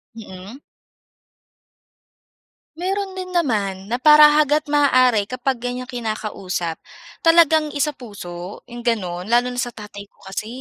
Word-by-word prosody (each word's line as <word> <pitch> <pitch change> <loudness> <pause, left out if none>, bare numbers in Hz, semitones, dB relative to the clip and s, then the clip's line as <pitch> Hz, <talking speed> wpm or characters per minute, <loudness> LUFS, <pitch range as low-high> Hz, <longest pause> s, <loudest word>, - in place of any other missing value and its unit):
Mm. 210 +4 -11 2.2
Meron 385 +2 -2
din 365 -1 -7
naman 205 - -1
na 245 - -1
para 300 +1 +8
hanggat 300 0 +2
maaari 255 -7 +3
kapag 255 +1 -2
ganyang 250 +1 -5
kinakausap 210 -7 -4 0.4
talagang 320 -2 +4
isapuso 205 -11 -5
yung 240 0 -10
gano'n. 190 -7 -2
Lalo 240 +2 +2
na 245 - -5
sa 245 -2 -3
tatay 205 -1 -10
ko - - -40
kasi, 195 +3 -6
245 Hz, 120 wpm, -20 LUFS, 205-290 Hz, 2.2 s, para